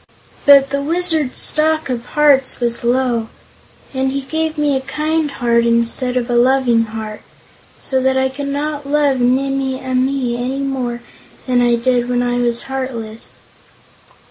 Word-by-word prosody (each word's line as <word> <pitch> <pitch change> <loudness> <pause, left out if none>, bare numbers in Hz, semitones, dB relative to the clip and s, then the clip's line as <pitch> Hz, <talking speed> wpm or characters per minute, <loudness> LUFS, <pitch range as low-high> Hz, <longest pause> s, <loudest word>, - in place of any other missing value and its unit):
But 275 -1 +7
the 280 0 -1
Wizard's 320 -3 +1
stock 315 +1 +2
of 245 -3 -3
hearts 280 -3 +3
was 235 -1 -1
low, 240 -2 0 0.7
and 265 0 -1
he 275 +1 -2
gave 315 +3 -3
me 295 -2 +1
a 265 - -1
Kind 305 +2 -2
Heart 235 -3 +1
instead 235 +2 +1
of 240 -1 -1
a 240 - -1
Loving 240 -2 +3
Heart, 215 -1 -7 0.6
so 265 -1 -1
that 265 0 +1
I 265 0 +2
could 280 +1 -6
not 290 0 -3
love 285 -3 +2
Nimmie 265 +1 0
Amee 260 -1 -1
any 260 +3 -3
more 255 -3 -3 0.4
than 250 -1 +2
I 240 -1 +3
did 245 0 0
when 245 0 0
I 245 0 -1
was 240 -1 0
heartless." 245 -5 -6
260 Hz, 155 wpm, -17 LUFS, 240-280 Hz, 0.7 s, But